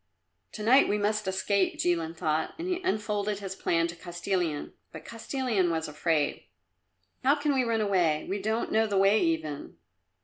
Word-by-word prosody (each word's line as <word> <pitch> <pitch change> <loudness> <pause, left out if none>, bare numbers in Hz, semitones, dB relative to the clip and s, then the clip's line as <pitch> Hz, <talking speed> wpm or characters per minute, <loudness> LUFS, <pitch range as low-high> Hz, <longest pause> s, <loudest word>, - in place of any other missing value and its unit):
"To 210 - -6
night 255 +5 +5
we 210 - +2
must 210 0 0
escape," 190 0 0
Jilin 165 -2 0
thought, 155 0 -1
and 340 +2 -5
he 365 0 -1
unfolded 210 - -1
his 195 -1 -6
plan 165 -3 +1
to 170 +1 -5
Kostilin. 175 -2 -3 0.2
But - - -10
Kostilin 230 -5 -1
was 160 -1 -1
afraid. 150 0 0 0.8
"How 275 +3 +5
can 290 -1 0
we 260 -2 +2
run 230 -2 0
away? 175 -7 +1
We 200 +1 -3
don't 220 +3 -1
know 220 0 +3
the 200 -2 0
way 195 +3 +4
even." 160 -3 -2
195 Hz, 170 wpm, -28 LUFS, 165-220 Hz, 0.8 s, night